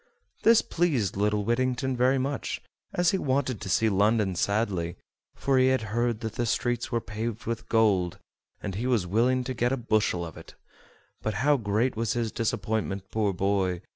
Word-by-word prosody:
This 230 0 +6
pleased 150 - 0
little 105 +1 +1
Whittington 130 +2 0
very 130 +2 +3
much, 135 +1 -2 0.3
as 175 -1 +2
he 195 - 0
wanted 130 - 0
to 95 - -5
see 110 - +3
London 105 0 +2
sadly, 95 -3 0 0.4
for 135 -1 +2
he 130 - +5
had 130 -2 +2
heard 120 -1 0
that 110 -2 -4
the 120 +1 -1
streets 120 +1 -1
were 120 - +1
paved 110 +1 -5
with 115 -1 -4
gold, 100 -6 +2 0.5
and 100 - -3
he 115 +7 -2
was 120 -8 +2
willing 120 +7 +2
to 130 +1 -3
get 120 0 0
a 135 - +1
bushel 110 -7 0
of 80 - -10
it; - - -12 0.7
but 110 -2 -2
how 150 0 +5
great 115 +1 0
was 115 0 0
his 115 -2 -1
disappointment, 105 -3 -2
poor 105 -2 +1
boy! 95 -1 0
115 Hz, 180 wpm, -27 LUFS, 100-125 Hz, 0.7 s, This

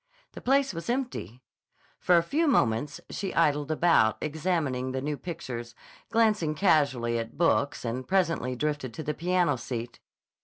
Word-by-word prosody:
The - - -10
place 270 -2 +2
was 165 +6 -6
empty. 235 - -3 0.6
For 180 -1 +4
a 170 - +3
few 310 - 0
moments 140 - +1
she 195 -1 -4
idled 150 -3 +2
about, 155 -9 +3
examining 150 -5 -1
the 130 - -1
new 150 +2 -2
pictures, 120 -8 -7 0.3
glancing 210 -9 +2
casually 140 -9 +2
at 115 0 -6
books, 150 -6 +1
and 125 +3 -3
presently 165 -9 +1
drifted 145 -3 -2
to 155 - -5
the 150 - -2
piano 175 -3 +1
seat. 120 -1 -6
150 Hz, 150 wpm, -28 LUFS, 125-180 Hz, 0.6 s, For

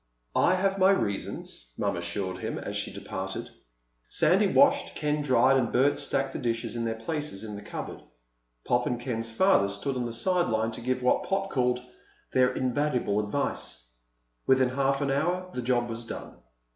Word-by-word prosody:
"I 185 - +4
have 195 +1 +1
my 190 +1 +6
reasons," 100 - -2
Mom 100 -2 0
assured 95 +2 -3
him - - -3
as - - -5
she - - -2
departed. - - -5 0.6
Sandy 190 +6 +4
washed, 280 +6 +4
Ken 150 -1 0
dried, 135 -1 +4
and 120 -3 0
Bert 135 +3 +3
stacked 135 0 -1
the - - -4
dishes 115 -2 -2
in 115 -1 -2
their 115 -1 -1
places 145 -3 -4
in 105 -2 -6
the 100 - -7
cupboard. - - -7 0.6
Pop 120 0 +2
and 120 - -1
Ken's 115 -2 -3
father 115 - +4
stood 130 +8 -2
on 125 -1 -1
the - - -5
side 180 +9 +2
lines 110 0 0
to - - -7
give 125 +1 -1
what 125 - +2
Pop 195 0 -1
called 125 -1 +1 0.5
their 130 0 +4
"invaluable 125 -4 0
advice." 105 - -3 0.6
Within 130 -1 +4
half 135 +1 +1
an 140 -1 +1
hour 180 +6 0
the 125 - -3
job 120 -1 +1
was 115 0 -4
done. 115 - -7
125 Hz, 180 wpm, -28 LUFS, 115-150 Hz, 0.6 s, my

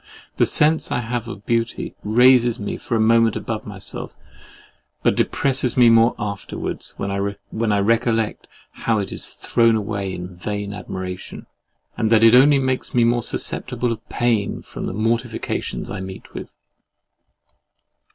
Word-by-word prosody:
The - - +4
sense 155 +2 +2
I 125 - 0
have 120 0 -3
of 105 -4 -9
beauty 115 0 -1
raises 120 +2 +4
me 105 - -3
for 120 - -3
a - - +1
moment 115 0 +4
above 110 -1 -4
myself, 100 -2 -7 0.9
but - - +4
depresses 135 -3 0
me 120 -2 +7
the - - +6
more 115 +1 +5
afterwards, 100 -2 -4
when 100 - -3
I 100 +2 -2
recollect 115 +1 +1 0.2
how 115 -1 -1
it 100 -2 -3
is - - -2
thrown 115 -1 +2
away 100 -2 -2
in 90 0 -7
vain 100 +2 -4
admiration, 95 -2 -7 0.5
and 110 -1 0
that 115 -1 +5
it 115 0 +7
only 140 +3 +7
makes 130 -2 -2
me 120 - +4
more 120 +1 +2
susceptible 120 +1 -2
of 115 -1 -7
pain 115 -4 0
from - - -6
the - - -4
mortifications 115 +1 -2
I 100 - -4
meet 95 0 -9
with. - - -7
115 Hz, 150 wpm, -21 LUFS, 100-120 Hz, 0.9 s, me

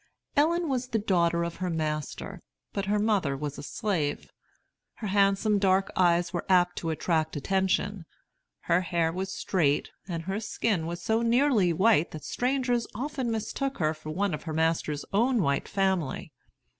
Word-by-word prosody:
Ellen 330 +4 +3
was 260 -3 -1
the 235 - 0
daughter 170 -5 +2
of 170 0 -4
her 185 -1 -2
master, 155 -3 -3 0.3
but 200 - -2
her 205 +2 +1
mother 205 -10 +1
was 145 0 -5
a - - -5
slave. 160 -4 -2 0.6
Her 225 - -7
handsome 200 +1 +3
dark 195 0 +2
eyes 175 -1 +3
were 175 - -2
apt 180 -1 +4
to 165 - -2
attract 160 0 0
attention; 190 +3 0 0.6
her 170 +2 +2
hair 170 -2 0
was 190 +2 -4
straight, 155 -7 0 0.2
and 165 -3 -4
her 190 +4 -2
skin 205 -5 -1
was 170 +1 -5
so 220 +3 +1
nearly 235 -5 +3
white 175 -1 +3
that 155 -2 -7
strangers 250 - 0
often 265 0 -2
mistook 230 +5 -2
her 155 -1 +1
for 155 0 -10
one 190 +3 0
of 150 - -3
her 160 - -4
master's 160 -2 0
own 235 +1 +3
white 140 -1 0
family. 190 -7 -1
190 Hz, 165 wpm, -28 LUFS, 165-220 Hz, 0.6 s, apt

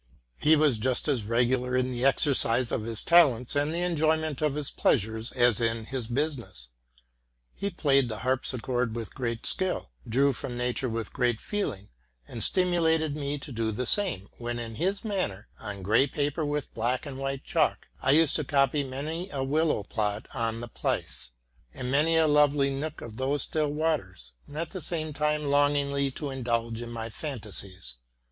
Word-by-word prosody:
He 155 +1 +5
was 145 -7 +3
just 130 +5 0
as 130 -8 0
regular 125 +3 +1
in 130 0 +1
the 120 0 -3
exercise 130 -3 +4
of 110 - -1
his 115 -2 -3
talents 140 -9 +5
and 145 +1 +1
the 170 +2 -1
enjoyment 160 -3 +1
of 150 -2 +1
his 150 -2 -2
pleasures 110 0 +1
as 120 -3 +3
in 115 -1 0
his 125 -2 -4
business. 120 - -3 0.8
He 200 - -3
played 140 -8 +2
the 110 0 -5
harpsichord 125 -2 0
with 115 -1 -5
great 115 -4 -3
skill, 185 - -1 0.2
drew 135 +4 +3
from 120 0 -5
nature 125 +1 -1
with 115 -2 -3 0.3
feeling, 110 - -4 0.4
and 115 - -3
stimulated 165 -4 +2
me 145 -1 -2
to 145 +1 -9
do 115 -2 -1
the 125 +4 -3
same; 175 - +1
when, 120 0 -3
in 115 -1 -5
his 190 - -1
manner, 185 - -2
on 100 -3 -6
gray 110 +8 +4
paper 145 +3 -1
and 150 - -1
with 150 -1 -3
black 120 +5 -1
and 135 -2 -7
white 135 0 -3
chalk, - - 0 0.2
used 155 0 +5
to 155 - -1
copy 140 +1 +2
many 155 +7 -4
a 135 -5 -3
willow 150 -4 +1
plot 105 +1 -2
on 115 -2 -2
the 120 - -5
Pleisse, 115 - -3 0.5
and 125 0 -4
many 155 +4 +3
a 160 - +5
lovely 145 -2 +4
nook 150 +3 -4
of 115 -2 -9
those 135 +1 0
still 155 -2 0
waters, 145 - -2 0.2
and 145 - -10
at 165 0 -3
the 185 - -6
same 155 -1 -3
time 150 +1 0
longingly 140 -1 +2
to 140 +1 -5
indulge 115 -3 -2
in 120 - -6
my 115 -1 -4
fancies. 100 - -5
135 Hz, 175 wpm, -28 LUFS, 115-150 Hz, 0.8 s, He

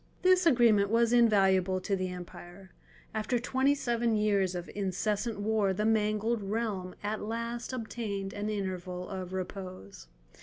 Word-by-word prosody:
This 370 -1 +5
agreement 230 -8 +5
was 230 +1 +3
invaluable 195 -5 +4
to 200 +1 0
the 185 -1 -2
empire. 180 +1 -10 0.4
After 220 +3 0
twenty 265 +3 +2
seven 235 -4 0
years 200 -3 +1
of 175 -1 -5
incessant 205 +3 -1
war 205 -2 +1
the 210 +3 -1
mangled 215 +1 +1
realm 200 -3 -3
at 210 +1 -2
last 230 +3 -4
obtained 220 -5 -4
an 205 +1 -3
interval 185 -3 -4
of 185 -2 -6
repose. 185 - -7
210 Hz, 140 wpm, -30 LUFS, 190-230 Hz, 0.4 s, This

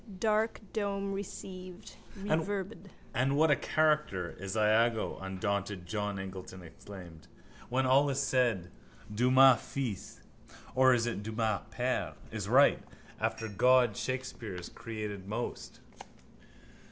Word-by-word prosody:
Dark 220 +1 +1
dome 200 -2 -1
received, 185 -2 -8 0.2
reverbed. 195 +2 -2 0.3
—And 135 +2 +1
what 155 0 +5
a - - +6
character 150 - +1
is 95 +2 -5
Iago! 110 +1 +2
undaunted 95 0 -2
John 105 +2 -2
Eglinton 95 -1 -7
exclaimed. 85 -2 -12 0.4
When 130 +2 +1
all 135 +3 +4
is 135 0 0
said 120 -10 +1 0.4
Dumas 130 +2 +6
fils 125 -8 -5 0.5
(or 130 -1 +6
is 115 -1 +1
it 120 -3 -2
Dumas 110 -2 -1
père?) - - -1 0.2
is - - -4
right. - - +5 0.4
After 115 - -1
God 120 +2 +4
Shakespeare 130 -6 -4
has 90 -1 -7
created 105 -4 -6
most. 115 +4 -5
120 Hz, 115 wpm, -31 LUFS, 100-140 Hz, 0.5 s, a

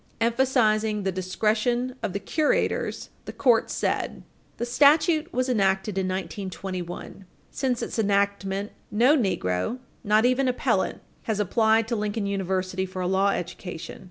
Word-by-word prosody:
Emphasizing 225 -3 +2
the 190 - 0
discretion 215 +7 0
of - - -2
the 200 - -3
curators, 305 +8 0
the - - -6
court 240 -4 +3
said: - - -2 0.3
"The 240 - -2
statute 300 +6 +4
was 255 +1 0
enacted 195 -4 +1
in 190 -1 0
1921. 185 -1 -5 0.2
Since 255 -4 -1
its - - -4
enactment, 200 -1 0 0.2
no 245 +8 +4
negro, 180 - 0 0.3
not 215 +1 +3
even 255 +2 +2
appellant, 250 - 0 0.2
has 220 -3 -1
applied 220 +2 +3
to 235 - -1
Lincoln 210 0 -2
University 190 -1 -1
for 185 0 -5
a - - 0
law 190 +2 +2
education. 175 -2 -5
210 Hz, 135 wpm, -25 LUFS, 190-240 Hz, 0.3 s, statute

